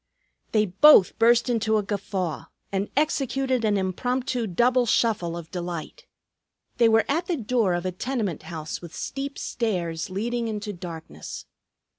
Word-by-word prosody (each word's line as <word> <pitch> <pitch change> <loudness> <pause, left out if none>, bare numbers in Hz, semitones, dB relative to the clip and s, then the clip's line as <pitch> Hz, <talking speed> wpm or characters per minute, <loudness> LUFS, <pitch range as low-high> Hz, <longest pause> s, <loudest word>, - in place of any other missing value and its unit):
They 215 -1 +3
both 200 +1 +6
burst 235 +1 +5
into 225 -2 +1
a 210 - 0
guffaw 190 -6 -3 0.3
and 195 +1 -1
executed 270 -4 +1
an 210 -2 +2
impromptu 245 +5 -1
double 240 +6 +2
shuffle 195 -8 +1
of 165 -1 -9
delight. 175 - -6 0.7
They 235 -2 +5
were 225 0 +4
at 330 +5 0
the 350 - 0
door 225 -6 +1
of 175 +1 -3
a 185 - 0
tenement 210 - -3
house 155 -3 -5
with 170 -2 -10
steep 275 +1 -4
stairs 175 -8 -2
leading 230 +5 -2
into 210 -1 -4
darkness. 170 -3 -8
215 Hz, 145 wpm, -25 LUFS, 180-245 Hz, 0.7 s, both